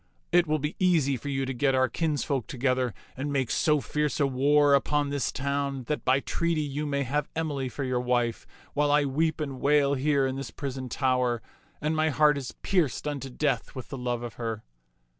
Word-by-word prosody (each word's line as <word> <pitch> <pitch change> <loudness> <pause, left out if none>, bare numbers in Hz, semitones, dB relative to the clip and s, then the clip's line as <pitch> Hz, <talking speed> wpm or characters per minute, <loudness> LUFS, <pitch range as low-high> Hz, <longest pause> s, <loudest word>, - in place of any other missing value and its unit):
It 175 -1 +4
will" 155 +1 +2
be 150 +1 -3
easy 165 -7 +3
for 130 +4 -6
you 135 -1 -1
to 135 - -3
get 135 +2 +2
our 130 0 +3
kinsfolk 145 -2 -1
together 130 -3 0 0.2
and 145 +2 -3
make 135 -3 0
so 150 -1 +3
fierce 150 +2 -1
a 145 - +4
war 140 +2 +4
upon 145 +1 +2
this 140 -3 -1
town 140 -1 -2
that 150 +4 -3
by 130 +2 +3
treaty 170 0 0
you 145 +1 -3
may 140 -1 0
have 145 +3 -1
Emily 145 -5 -2
for 140 - -5
your 130 -1 0
wife, 120 -2 0 0.3
while 145 0 +2
I 145 0 +4
weep 155 +4 0
and 140 -4 -4
wail 145 -1 +4
here 140 0 +2
in 130 0 -2
this 135 -2 -5
prison 130 -2 -5
tower, 125 -2 +1 0.4
and 155 +1 -1
my 155 0 +2
heart 150 +1 +4
is 130 - -6
pierced 165 -6 +1
unto 140 -2 -3
death 135 -2 -1
with 130 - -7
the - - -5
love 120 -1 -2
of 120 -2 -6
her." 115 -2 -3
140 Hz, 205 wpm, -27 LUFS, 130-150 Hz, 0.4 s, It